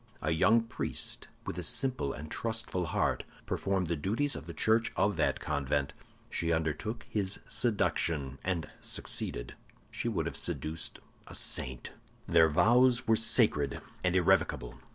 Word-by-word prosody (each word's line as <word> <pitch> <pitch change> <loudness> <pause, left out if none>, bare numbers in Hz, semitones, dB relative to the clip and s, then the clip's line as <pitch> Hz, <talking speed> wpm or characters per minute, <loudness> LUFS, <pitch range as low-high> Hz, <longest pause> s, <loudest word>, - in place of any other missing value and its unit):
A - - +1
young 105 +8 +5
priest, 115 0 -4 0.2
with - - -4
a - - -4
simple 130 - +1
and 75 +3 -7
trustful 110 -6 -2
heart, - - 0 0.2
performed 95 -2 0
the 85 0 0
duties 110 - 0
of 75 - -8
the 85 - -6
church 110 +6 +3
of 100 -1 +2
that 80 - +1
convent. 70 0 -1 0.3
She 85 0 -1
undertook 80 +8 -1
his 100 -2 -2
seduction, 80 - 0
and 90 -4 -1
succeeded; - - -4 0.4
she - - -3
would - - -1
have - - -3
seduced 80 +1 0 0.3
a - - -9
saint. 65 -1 -2 0.4
"Their 80 -1 +6
vows 120 +9 +4
were 115 - +5
sacred 110 - +3 0.2
and 90 0 +2
irrevocable. 90 -8 +2
90 Hz, 145 wpm, -31 LUFS, 75-110 Hz, 0.4 s, Their